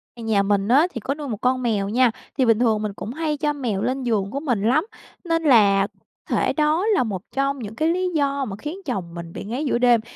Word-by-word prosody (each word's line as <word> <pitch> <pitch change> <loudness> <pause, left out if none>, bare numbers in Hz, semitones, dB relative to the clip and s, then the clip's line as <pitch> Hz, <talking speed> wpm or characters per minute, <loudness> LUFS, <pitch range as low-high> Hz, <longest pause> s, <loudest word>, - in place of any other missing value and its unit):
Nhà 225 -4 +1
mình 200 0 +1
á 280 +9 +5
thì 235 - -4
có 265 +5 -2
nuôi 295 0 -7
một 220 -5 -3
con 255 0 +1
mèo 210 -5 0
nha. 245 +2 +3 0.3
Thì 260 - +3
bình 225 -2 +4
thường 225 -3 +2
mình 210 -2 -3
cũng 215 +3 -6
hay 305 0 -2
cho 295 0 0
mèo 240 -9 -2
lên 260 +3 -1
giường 210 -5 0
của 275 - -2
mình 250 -9 -1
lắm, 260 - +3 0.4
nên 330 -2 0
là 200 -8 +5 0.4
có - - +1
thể - - +1
đó 310 +4 +1
là 415 -8 +3
một 200 -6 -4
trong 275 0 0
những 220 -2 -7
cái 315 +7 +1
lý 365 +2 0
do 280 -2 +1
mà 195 - -5
khiến 300 - -6
chồng 190 - -4
mình 170 -1 -8
bị - - -6
ngáy 245 +9 -3
giữa 260 - +1
đêm. 240 -2 +4
245 Hz, 255 wpm, -22 LUFS, 210-290 Hz, 0.4 s, á